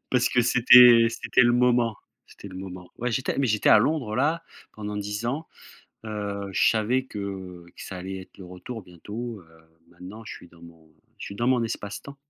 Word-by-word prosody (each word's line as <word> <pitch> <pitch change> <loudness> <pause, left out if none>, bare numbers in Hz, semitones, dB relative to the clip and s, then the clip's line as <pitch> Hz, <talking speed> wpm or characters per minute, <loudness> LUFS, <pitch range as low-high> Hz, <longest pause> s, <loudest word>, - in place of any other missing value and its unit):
Parce 125 -1 +2
que 125 - +3
c'était 120 -1 +7
c'était 125 - +1
le 120 0 +4
moment, 120 -2 +2 0.3
c'était 100 - -12
le 95 - -11
moment. 90 -2 -9
Ouais 125 0 -3
j'étais 130 +2 -2
mais 135 - +2
j'étais 110 -2 +1
à - - +8
Londres 125 -4 -1
là, 160 +5 +1 0.3
pendant 105 -1 -6
10 105 +3 -4
ans, 145 +6 -3 0.6
heu, 100 -2 -5
je - - +3
savais 115 +4 0
que 95 -5 -7
que - - -11
ça 95 - -7
allait 95 +1 -6
être 95 - -17
le 95 - -10
retour 90 +6 -9
bientôt, 105 +5 -8
heu, 80 0 -24
maintenant 90 +6 -11
je - - -7
suis - - -13
dans 85 0 -21
mon 85 -2 -16 0.3
je - - -7
suis 100 - -8
dans 120 +4 -1
mon 125 -2 +2
espace-temps. 110 +5 -6
105 Hz, 200 wpm, -25 LUFS, 95-120 Hz, 0.6 s, à